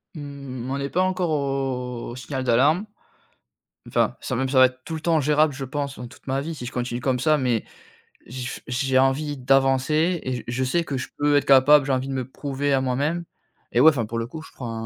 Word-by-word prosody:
Mmh. 140 -4 -7
On 140 - -1
est 140 0 -3
pas 180 - +1
encore 185 -2 0
au 135 -4 -2
signal 130 0 -4
d'alarme. 145 - +3 1.0
Enfin, - - +1
ça - - -3
même 130 +2 -1
ça 135 - 0
va 130 - +9
être 130 0 -3
tout 165 - -5
le 155 - -6
temps 165 -1 +2
gérable, 150 +1 +3
je 135 - -6
pense 140 0 -4
dans 125 - -6
toute 125 - -17
ma 135 0 -1
vie 160 +2 -5
si 125 - -7
je 125 - -6
continue 120 -1 -3
comme 130 -2 0
ça 155 +4 +3
mais, 125 -5 0 0.6
j 125 +1 -6
f - - -6
j'ai 130 +1 0
envie 135 +2 +1
d'avancer, 135 +6 +2
et 130 - -2
j - - -8
je 120 +2 -1
sais 170 +7 +1
que 140 -4 -4
je 130 - -5
peux 145 0 +3
être 145 - +3
capable, 140 +1 +6
j'ai 140 - -1
envie 130 0 0
de 135 - -3
me 130 -2 -2
prouver 140 +1 -2
à 135 - +3
moi-même, 145 +7 -1 0.5
et 120 - +2
ouais, 155 - +9
enfin 125 -8 -1
pour 115 +1 -4
le 115 - -1
coup, 155 +6 -8
je - - -14
prends 120 -3 -6
135 Hz, 240 wpm, -24 LUFS, 130-145 Hz, 1.0 s, va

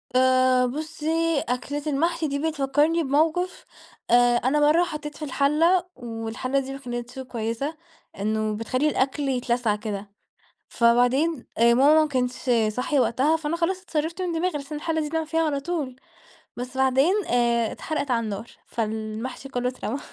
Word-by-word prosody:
آآ 255 0 +4
بُصّي، 315 +2 -1
أكلة 285 +4 -2
المحشي 325 +3 0
دي 280 0 -2
بتفكرني 305 +2 +1
بموقف. 320 +6 0 0.5
آآ 245 0 +5
أنا 270 +5 +1
مرّة 305 +4 +4
حطيت 300 -3 -6
في 305 - -5
الحلة، 315 +6 +2
والحلة 240 +2 -3
دي 270 0 -5
ما 275 - -7
كانتش 240 0 -6
كويّسة، 250 +4 -3 0.4
إنّه 215 +1 0
بتخلّي 255 +6 0
الأكل 275 +1 0
يتلسع 240 -4 0
كده. 205 -2 -6 0.6
فبعدين 245 +5 +2
ماما 265 +7 +6
ما 310 - +2
كانتش 250 -2 -2 0.2
صاحية 250 +6 0
وقتها، 260 +7 +2
فأنا 320 +1 -2
خلاص 370 +2 0
اتصرفت 330 0 -3
من 360 -2 -1
دماغي؛ 360 +2 0
بحيث 285 0 -6
إن 300 - -3
الحلة 320 +1 -1
دي 300 - -3
بنعمل 320 -1 -2
فيها 325 +1 +1
على 285 -2 0
طول، 290 -5 -3 0.6
بس 250 +1 -6
بعدين 265 +7 +3
آآ 235 -2 +2
اتحرقت 290 -3 -3
على 235 -1 +2
النار، 215 +2 -5 0.2
فالمحشي 220 +4 -4
كلّه 250 -1 -1
اترمى. 255 +1 -4
270 Hz, 150 wpm, -25 LUFS, 245-310 Hz, 0.6 s, ماما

